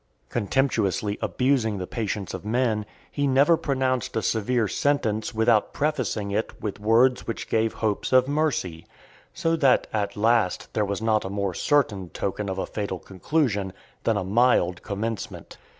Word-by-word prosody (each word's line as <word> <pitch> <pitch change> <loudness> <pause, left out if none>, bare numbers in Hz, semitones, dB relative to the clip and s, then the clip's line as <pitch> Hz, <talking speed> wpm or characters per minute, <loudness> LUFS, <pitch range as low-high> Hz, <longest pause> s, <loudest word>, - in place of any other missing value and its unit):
Contemptuously 110 -4 0
abusing 125 -5 +1
the 90 - -4
patience 105 -2 -3
of 95 - -6
men, 110 -1 0 0.2
he 145 0 0
never 140 +5 +5
pronounced 130 -4 -1
a 110 - -1
severe 115 +1 +1
sentence 110 -3 0
without 110 -1 +2
prefacing 125 -9 -1
it 110 +3 -1
(489) - - -20
with 105 -1 -3
words 115 +4 +3
which 115 - -4
gave 110 0 +1
hopes 110 -2 -1
of 130 0 +5
mercy; 140 - -1 0.4
so 165 0 0
that, 140 -5 +3
at 100 -2 -2
last, 110 -3 +1
there 105 - +1
was 100 +2 -3
not 110 -1 +2
a 95 - -4
more 100 -1 -2
certain 105 - +1
token 100 +3 -3
of 95 - -3
a - - -1
fatal 100 -3 -4
conclusion, 100 - -1 0.3
than 115 -2 +2
a 100 - -1
mild 95 -4 +2
commencement. 110 +2 -5
110 Hz, 160 wpm, -25 LUFS, 100-130 Hz, 0.4 s, never